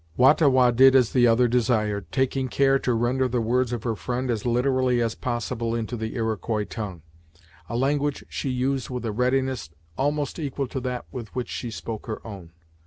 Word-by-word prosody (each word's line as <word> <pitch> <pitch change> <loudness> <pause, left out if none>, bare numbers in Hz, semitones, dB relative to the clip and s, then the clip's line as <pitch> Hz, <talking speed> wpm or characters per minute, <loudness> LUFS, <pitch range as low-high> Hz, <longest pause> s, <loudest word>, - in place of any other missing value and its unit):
Wah 130 +3 +7
ta 155 -1 +2
Wah 130 -2 +5
did 130 +2 +6
as 125 -4 +4
the 120 -2 +5
other 120 +2 +4
desired, 110 -4 0
taking 130 0 0
care 135 +1 +3
to 125 -3 0
render 125 +3 +1
the 125 0 -1
words 120 +2 +1
of 120 -3 -3
her 115 -2 -1
friend 125 +3 -2
as 115 0 -2
literally 125 0 +2
as 115 -2 0
possible 120 -1 -3
into 115 +1 -3
the 110 -1 -4
Iroquois 110 -2 -1
tongue, 100 -6 -6 0.7
a 115 - -2
language 145 +2 0
she 135 - -4
used 130 +1 -1
with 125 -2 -4
a 110 - -1
readiness 130 -2 0 0.3
almost 145 +3 -1
equal 140 -2 -2
to 135 - -3
that 125 -1 -4
with 120 -5 -6
which 125 -2 -3
she 120 - -4
spoke 110 0 -6
her 110 - -4
own. 95 -7 -9
125 Hz, 195 wpm, -25 LUFS, 115-130 Hz, 0.7 s, Wah